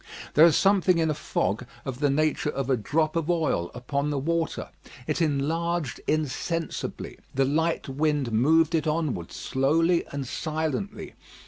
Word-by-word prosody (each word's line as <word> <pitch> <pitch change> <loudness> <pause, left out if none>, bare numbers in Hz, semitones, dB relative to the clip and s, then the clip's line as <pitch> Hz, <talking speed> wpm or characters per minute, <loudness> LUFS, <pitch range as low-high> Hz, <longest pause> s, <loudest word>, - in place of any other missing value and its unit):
There 160 +3 +8
is 165 - +3
something 195 -2 +4
in 160 -1 +2
a - - 0
fog 110 -6 -1 0.2
of 130 -2 -5
the 145 -1 +2
nature 150 +1 +1
of 135 -2 -2
a - - +5
drop 155 +8 0
of 165 0 -1
oil 155 - +1
upon 140 +4 -2
the 145 - -1
water. 165 +3 -1 0.4
It - - -1
enlarged 160 +1 -1
insensibly. 155 +2 -2 0.2
The 135 0 +3
light 160 +5 0
wind 145 -2 0
moved 160 +8 +3
it 160 -2 +1
onward 150 - -1
slowly 165 +6 +1
and 140 -1 -5
silently. 160 - -3
155 Hz, 150 wpm, -26 LUFS, 135-165 Hz, 0.4 s, There